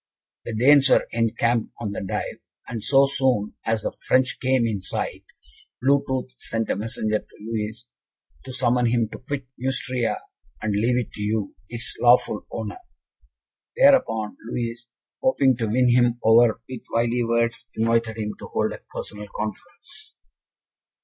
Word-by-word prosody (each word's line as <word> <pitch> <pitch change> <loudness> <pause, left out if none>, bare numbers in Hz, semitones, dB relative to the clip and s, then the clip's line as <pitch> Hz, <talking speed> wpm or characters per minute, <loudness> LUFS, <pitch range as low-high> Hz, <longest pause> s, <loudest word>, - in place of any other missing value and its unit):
"The 115 - -4
Danes 140 +4 +6
were - - +4
encamped 115 0 0
on 105 -4 -3
the - - -4
Dive, 95 - -4 0.3
and 115 -3 -5
so 135 0 +5
soon 130 -6 +1
as 110 -1 +1
the - - -3
French 130 0 +2
came 130 -2 +2
in 105 -4 -1
sight, - - -4 0.6
Blue 140 +2 +3
tooth 130 -1 -2
sent 115 0 -2
a - - +1
messenger 110 0 -1
to - - -21
Louis, 110 +1 -4 0.6
to 130 - -7
summon 125 -1 +2
him 115 -2 +1
to - - -8
quit 135 +1 -5
Neustria, 130 -2 0 0.4
and 110 -2 -1
leave 115 +5 +2
it 125 - -2
to - - -8
you, 105 -1 -1
its 120 +1 -3
lawful 125 +1 +4
owner. 370 - -5 1.0
Thereupon, 260 - +4
Louis, 120 0 -4 0.3
hoping 140 - +3
to 115 -2 -1
win 125 +3 +3
him 120 -1 +4
over 115 0 +5
with 130 -3 -7
wily 120 +1 +1
words, 115 0 0
invited 115 0 +1
him 105 -1 -3
to - - -8
hold - - -1
a - - -10
personal 105 0 -6
conference." 110 -2 -7
115 Hz, 155 wpm, -24 LUFS, 110-130 Hz, 1.0 s, Danes